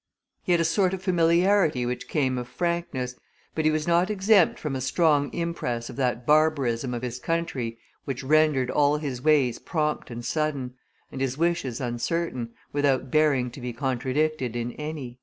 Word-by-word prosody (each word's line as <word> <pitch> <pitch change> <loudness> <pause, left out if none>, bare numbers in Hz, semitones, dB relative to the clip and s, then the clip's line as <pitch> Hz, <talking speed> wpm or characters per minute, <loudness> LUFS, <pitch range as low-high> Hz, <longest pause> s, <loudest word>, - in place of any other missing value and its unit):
He - - -2
had 175 - +4
a - - +3
sort 185 +3 +2
of 190 - -11
familiarity 170 -4 +3
which 125 +1 -4
came 130 -4 0
of 125 - -6
frankness, 150 -4 -2 0.4
but 160 - -1
he - - +6
was 155 0 -1
not 170 +3 +3
exempt 200 -3 +4
from 150 -3 -4
a 130 - -3
strong 145 +1 +2
impress 145 -9 -3
of - - -11
that 125 -2 -1
barbarism 140 -5 +2
of 120 - -5
his 125 0 -4
country 135 -8 -2 0.3
which 135 -1 -4
rendered 150 -3 +3
all 145 0 +3
his 140 -5 -4
ways 140 -5 +3
prompt 150 -4 -2
and 120 0 -7
sudden, 145 -5 -1 0.4
and 135 - -6
his 135 0 -1
wishes 165 -7 0
uncertain, 125 +1 -2 0.2
without 135 -3 +1
bearing 140 -5 +2
to 130 - -10
be 125 0 -4
contradicted 130 +1 -1
in 120 0 -2
any." 145 -4 -6
145 Hz, 175 wpm, -26 LUFS, 125-160 Hz, 0.4 s, he